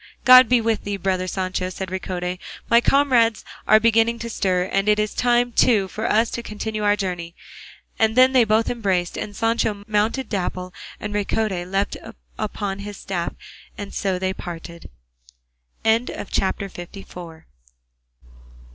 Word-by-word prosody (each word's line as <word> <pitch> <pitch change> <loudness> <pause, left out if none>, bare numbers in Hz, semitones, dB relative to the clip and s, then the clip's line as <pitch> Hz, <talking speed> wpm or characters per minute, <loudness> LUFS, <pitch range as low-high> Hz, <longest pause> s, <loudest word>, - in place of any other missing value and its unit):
"God 255 -2 +9
be 250 -1 +5
with 225 -1 0
thee, 200 0 -3
brother 185 -1 -1
Sancho," 185 0 -2
said 190 0 -6
Ricote; 180 -1 -4 0.3
"my 235 +1 +7
comrades 245 -6 +3 0.2
are 215 - +7
beginning 230 +1 +3
to 235 0 -6
stir, 185 -4 +1
and 195 +2 0
it 210 - +4
is 210 0 -1
time, 245 0 +2
too, 220 -5 +3
for 215 +4 -3
us 225 +1 +2
to 235 - -4
continue 215 -1 -5
our 205 0 +4
journey;" 180 -4 -4 0.6
and 220 0 +2
then 255 +1 +6
they 255 -2 +5
both 220 +1 +2
embraced, 190 -7 -1
and 205 - -5
Sancho 225 -2 0
mounted 220 +5 0
Dapple, 185 -2 -3 0.3
and 210 0 -5
Ricote 200 -3 -1
leant 195 +1 -1 0.4
upon 200 -1 -3
his 205 0 -7
staff, 175 -3 -4 0.4
and 205 -1 -7
so 190 -2 -1
they 190 +1 -1
parted. 170 -2 -9 1.0
CHAPTER 220 -3 0
LV. 175 -3 -10
205 Hz, 145 wpm, -22 LUFS, 185-225 Hz, 1.0 s, God